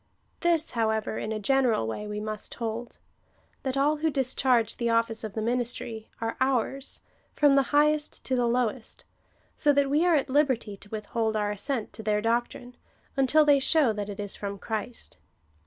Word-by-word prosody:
This, 335 -2 +2
however, 220 -2 0
in 215 - -4
a 220 - -1
general 245 - +2
way, 160 - -4
we 210 0 -4
must 215 0 -4
liold,^ 230 +1 -5 0.6
that 265 0 -2
all 295 +3 +3
who 320 +1 +1
discharge 255 -4 +1
the 235 -1 0
office 230 -1 +1
of 215 -2 -5
the 220 - -2
ministry, 235 -2 -2
are 225 0 -3
ours, 265 +1 0 0.3
from 290 -2 +5
the 275 - +5
highest 300 +1 +2
to 260 - 0
the 245 -1 +2
lowest, 240 0 -1 0.5
so 295 - +3
that 280 -1 +2
we 300 +3 +3
are 350 -2 +4
at 280 - +1
liberty 260 -7 +1
to 200 - -15
with 215 -1 -5
hold 225 -1 -1
our 210 -1 0
assent 220 +3 -2
to - - -7
their 210 -1 +1
doctrine, 240 +2 -2 0.4
until 280 +3 +4
they 290 -1 +5
show 280 -3 +3
that 210 -1 -4
it 205 - -7
is 205 -1 -3
from 200 -1 -5
Christ. 220 +4 -5
235 Hz, 185 wpm, -27 LUFS, 220-275 Hz, 0.6 s, from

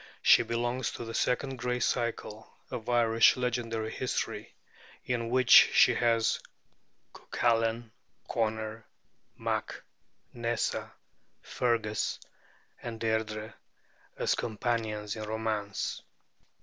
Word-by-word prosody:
She - - +7
belongs 120 +2 -1
to 120 - -6
the 115 - -6
second 130 +3 0
great 125 -1 -1
cycle 115 -2 -2 0.2
of 115 0 -5
Irish 115 -1 +4
legendary 115 -3 -2
history, 130 - -3 0.5
in 115 -2 -1
which 130 0 +1 0.2
she - - +6
has 115 -1 +2 0.7
Cuculain, 115 -1 0 0.4
Conor 110 -1 -2 0.5
mac - - -3 0.5
Nessa, 120 0 -2 0.5
Fergus, 115 -3 -1 0.6
and 115 -2 -6
Deirdrê, 110 -1 -2 0.6
as - - +1
companions 110 -2 -2
in 110 - -6
romance. 110 -2 -3
115 Hz, 95 wpm, -30 LUFS, 110-120 Hz, 0.7 s, She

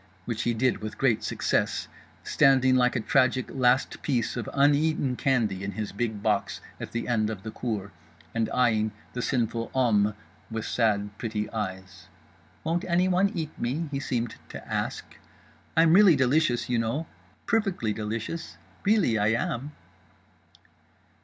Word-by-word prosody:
Which 115 -2 -2
he 120 0 0
did 125 +3 +1
with 110 0 -6
great 125 -5 +2
success, - - 0 0.4
standing 130 -3 +4
like 125 0 +3
a - - +1
tragic 130 +2 +2
last 130 0 +2
piece 125 -6 0
of 120 -3 -4
uneaten 145 -1 +2
candy 115 -8 0
in 100 0 -4
his 105 +2 -4
big 105 -1 -3
box 105 -3 0 0.2
at - - -6
the 115 0 -3
end 110 -3 +1
of 105 -4 -6
the 110 - -5
cour, 105 -6 -4 0.4
and 115 -1 0
eyeing 110 -3 +2 0.2
the 125 - -3
sinful 115 -2 -1
hommes 105 -5 +3 0.3
with 110 -1 -4
sad 105 -3 0
pretty 105 -2 -2
eyes. 95 -4 -5 0.6
Won't 165 +2 0
anyone 185 +2 +2
eat 160 -3 -3
me?—he 140 +3 -2
seemed 120 -4 -2
to - - -9
ask.—I'm 165 0 -2
really 195 -3 +7
delicious, 130 -3 +2
you 120 -2 +1
know, 115 +8 -1 0.4
perfectly 195 - 0
delicious, 115 +10 -5 0.3
really 200 - +3
I 105 - +2
am. 120 +4 -2
120 Hz, 140 wpm, -27 LUFS, 110-140 Hz, 0.6 s, really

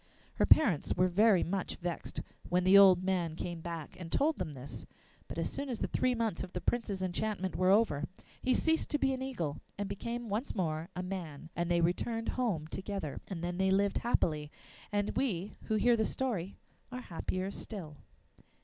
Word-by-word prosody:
Her - - +3
parents 205 - +5
were 180 +1 +4
very 195 +1 +5
much 190 +1 -2
vexed 175 -1 -4 0.3
when 180 +1 +2
the 185 +2 +6
old 190 -2 +8
man 180 -4 0
came 170 0 -4
back 165 -2 -6
and 170 -2 -7
told 310 +2 +2
them 165 -5 -3
this, 135 +1 -8 0.4
but - - -7
as - - 0
soon 280 0 -3
as 240 - -2
the - - -1
three 255 -1 +1
months 225 -6 -1
of 185 - -6
the - - -2
Prince's 205 -3 -1
enchantment 190 +1 -2
were 185 0 +3
over, 190 -8 +4 0.4
he 255 -1 +2
ceased 320 +4 +1
to 295 - +1
be 270 -2 +2
an 260 - -4
eagle 170 - -3 0.2
and 205 0 -2
became 235 +4 -4
once 215 +6 -2
more 165 -3 -1
a 180 - -3
man, 165 -5 -6
and 170 0 -1
they 170 -1 +3
returned 225 +7 0
home 215 -12 0
together. 190 -5 -4
And 175 -4 -5
then 175 +1 -2
they 190 0 +3
lived 200 +1 +2
happily, 155 -10 +1 0.4
and 205 0 0
we 205 -7 0
who 220 - 0
hear 235 +3 +4
the 220 -1 +1
story 200 -8 -2 0.4
are 250 0 -5
happier 185 0 -3
still. 170 -9 -7
190 Hz, 195 wpm, -32 LUFS, 170-225 Hz, 0.4 s, old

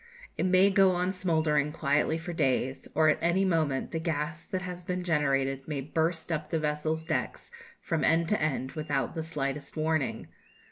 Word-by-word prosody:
It - - 0
may 185 +2 +5
go 195 -2 +5
on 180 +1 0
smouldering 160 -5 +1
quietly 150 0 +1
for 165 +2 -6
days, 130 -2 0
or 155 +1 +4
at 150 - +2
any 175 +3 +2
moment 155 -7 0
the 165 - -2
gas 155 0 -2
that 185 -2 -3
has 180 0 -6
been 180 +1 -3
generated 135 -5 0
may 145 -3 -2
burst 160 +4 -1
up 155 -1 -2
the 165 - 0
vessel's 155 +1 -1
decks 170 - -3 0.3
from 165 -2 -1
end 165 +1 +3
to 210 - +1
end, 135 -3 -1
without 145 -5 -2
the 165 - -3
slightest 145 -2 -4
warning. 155 -3 -1
160 Hz, 180 wpm, -29 LUFS, 145-175 Hz, 0.3 s, may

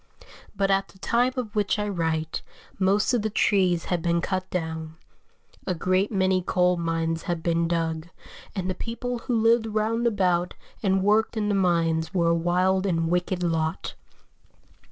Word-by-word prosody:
But 195 0 +1
at 195 0 +2
the - - -19
time 240 +6 +1
of 220 -5 -4
which 205 0 +1
I 210 0 -1
write, 160 -4 -2 0.4
most 200 +5 +2
of 240 - +2
the 220 - -1
trees 185 -5 +2
had 175 -2 -1
been 170 0 +1
cut 185 +1 -2
down; 160 -2 -4 0.7
a 185 - 0
great 185 +4 +1
many 190 -2 +2
coal 180 0 +2
mines 165 -1 -1
had 170 -2 -2
been 170 -1 +1
dug, 165 -1 -2 0.5
and 185 -2 -2
the 185 - 0
people 235 +5 -4
who 230 0 -1
lived 225 0 +3
round 220 +2 0
about 180 -5 +1 0.3
and 190 -2 +2
worked 215 +3 +2
in 210 -1 0
the - - +1
mines 170 -2 +1
were 170 -2 +3
a - - +4
wild 180 +3 +1
and 165 -3 0
wicked 180 0 0
lot. 165 0 -1
185 Hz, 170 wpm, -25 LUFS, 170-205 Hz, 0.7 s, a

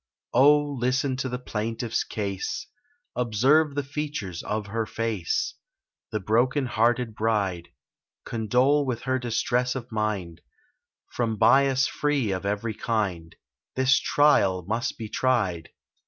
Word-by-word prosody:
Oh, 145 +4 +6 0.2
listen 130 +2 +1
to 130 0 -2
the 125 - -3
plaintiff's 115 -1 -2
case: 100 -3 -4 0.5
Observe 135 +6 +3
the 145 - 0
features 140 - -4
of 105 0 -3
her 110 +2 -3
face— 110 -7 -2 0.6
The 110 - -1
broken 125 +7 +1
hearted 120 0 +1
bride! 100 -6 -1 0.6
Condole 125 +6 +2
with 125 -4 -3
her 130 0 0
distress 125 +1 0
of 125 -3 -6
mind— 100 -6 -2 0.7
From 115 -3 -1
bias 135 +3 +4
free 145 -8 0
of 95 +1 -3
every 105 +2 -2
kind, 95 -8 -2 0.4
This 130 +1 +4
trial 95 - +3
must 115 +4 -2
be 110 - -5
tried! 105 -9 0
115 Hz, 125 wpm, -26 LUFS, 105-130 Hz, 0.7 s, Oh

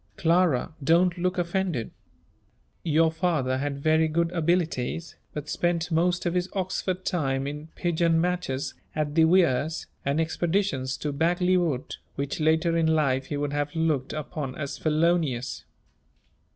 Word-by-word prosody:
Clara, 165 -5 +2
don't 175 +4 +4
look 180 +1 -1
offended. 175 - -1 0.9
Your 160 0 +3
father 160 -7 0
had 140 0 -2
very 160 0 +4
good 165 +2 0
abilities, 165 -3 -1 0.2
but 150 -1 -6
spent 175 +1 -1
most 175 +2 +1
of 170 - 0
his 180 +1 0
Oxford 185 -1 -2
time 135 -6 0
in 150 +2 -5
pigeon 170 -1 +2
matches 175 -6 -1 0.2
at 150 -1 -1
the 160 0 +5
Weirs, 160 -3 +2 0.2
and 140 +3 0
expeditions 160 -5 0
to 150 - -3
Bagley 175 +5 +2
wood, 160 -8 -1 0.2
which 140 +2 -3
later 160 +2 +2
in 165 -1 +2
life 140 -5 +2
he 145 - -3
would 145 0 -2
have 145 +1 -2
looked 160 -5 0
upon 150 -3 -4
as 140 -2 -4
felonious. 155 -5 0
160 Hz, 140 wpm, -26 LUFS, 145-175 Hz, 0.9 s, the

